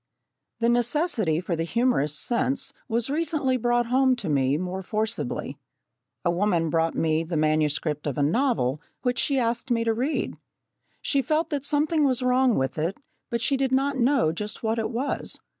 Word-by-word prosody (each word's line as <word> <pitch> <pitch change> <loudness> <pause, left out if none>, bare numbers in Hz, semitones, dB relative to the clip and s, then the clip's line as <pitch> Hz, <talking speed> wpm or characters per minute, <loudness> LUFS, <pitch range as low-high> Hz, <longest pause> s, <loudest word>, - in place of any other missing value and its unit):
The 230 - +3
necessity 240 - +1
for 180 -1 -2
the 165 - -1
humourous 170 - +1
sense 255 - 0
was 235 +2 -1
recently 295 -4 0
brought 240 0 +1
home 260 +2 +3
to 240 - -5
me 140 -1 +2
most 185 +2 -4
forcibly. 220 0 -3 0.7
A 175 - +3
woman 170 -3 +1
brought 165 0 +1
me 160 0 +1
the 165 0 -3
manuscript 155 -1 +1
of 140 - -3
a 145 - +2
novel 155 - +1 0.2
which 245 -1 0
she 280 - +1
asked 235 +1 -1
me 230 -1 +2
to 225 -1 +1
read. 260 +7 -2 0.6
She 280 - +2
felt 310 +4 0
that 285 -2 -1
something 300 +2 +1
was 260 -2 +2
wrong 250 -1 +3
with 135 +3 -1
it, 170 - -2 0.3
but 235 -1 -2
she 275 - +2
did 265 -1 0
not 275 +2 +2
know 255 - +3
just 210 +8 -5
what 225 +1 0
it 220 - -1
was. 255 +4 -2
235 Hz, 175 wpm, -25 LUFS, 165-265 Hz, 0.7 s, The